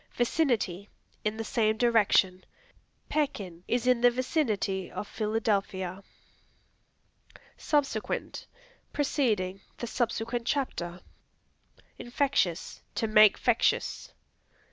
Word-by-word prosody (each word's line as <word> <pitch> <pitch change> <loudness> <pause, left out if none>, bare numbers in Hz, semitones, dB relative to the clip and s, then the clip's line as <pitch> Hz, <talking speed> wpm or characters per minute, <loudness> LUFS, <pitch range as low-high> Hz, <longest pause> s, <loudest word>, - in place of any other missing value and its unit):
Vicinity 235 - 0 0.3
In 215 +1 -1
the 225 - -3
same 220 -1 +1
direction; 210 -6 +3 0.6
"Pekin 200 - -2
is 245 0 0
in 250 -2 +3
the 245 - +7
vicinity 235 - -1
of 210 - -6
Philadelphia." 200 -4 -1 1.5
Subsequent 275 -7 -2 0.5
Preceding; 215 -10 0 0.2
"The - - -4
subsequent 235 0 -2
chapter." 180 -11 -2 1.0
Infectious 240 - -1
To - - 0
make 215 -1 +6
fectious. 240 -2 +1
220 Hz, 85 wpm, -29 LUFS, 195-245 Hz, 1.5 s, the